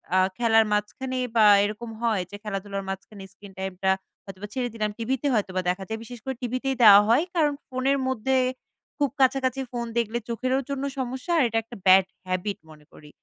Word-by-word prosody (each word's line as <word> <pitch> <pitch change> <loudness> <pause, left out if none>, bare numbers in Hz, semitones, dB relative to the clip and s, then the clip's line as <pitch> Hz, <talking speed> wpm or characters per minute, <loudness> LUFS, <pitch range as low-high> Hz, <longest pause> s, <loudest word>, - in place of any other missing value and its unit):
আ - - +5 0.2
খেলার 225 -2 +4
মাঝখানে 255 +5 -2 0.2
বা 220 -2 +6 0.2
এরকম 215 +3 -4
হয় 220 -5 +1
যে - - -7
খেলা-ধুলার 195 -1 -4
মাঝখানে 195 +1 -7
screen 200 -2 -14
টাইমটা 190 0 -2 0.4
হয়তোবা 195 +1 -8
ছেড়ে 250 -2 -2
দিলাম। 215 -2 -1
টিভিতে 265 +4 -1
হয়তোবা 185 -4 0
দেখা 190 +2 -2
যায় 220 0 -4
বিশেষ 245 0 -10
করে 265 -1 -3
টিভিতেই 255 +2 -1
দেওয়া 205 -1 +10
হয় 250 +8 +4
কারণ 300 -3 +3
ফোনের 265 +1 0
মধ্যে 260 +1 0 0.6
খুব 285 -2 +1
কাছাকাছি 260 0 +2
ফোন 240 -1 -3
দেখলে 235 0 0
চোখেরও 255 +3 0
জন্য 280 0 -3 0.2
সমস্যা 260 +6 -4
আর 295 - +4
এটা 225 0 -2
একটা 235 0 -11
bad 190 0 +7 0.2
habit 185 +2 -2
মনে 150 -1 -16
করি। 150 -1 -15
225 Hz, 180 wpm, -25 LUFS, 200-260 Hz, 0.6 s, দেওয়া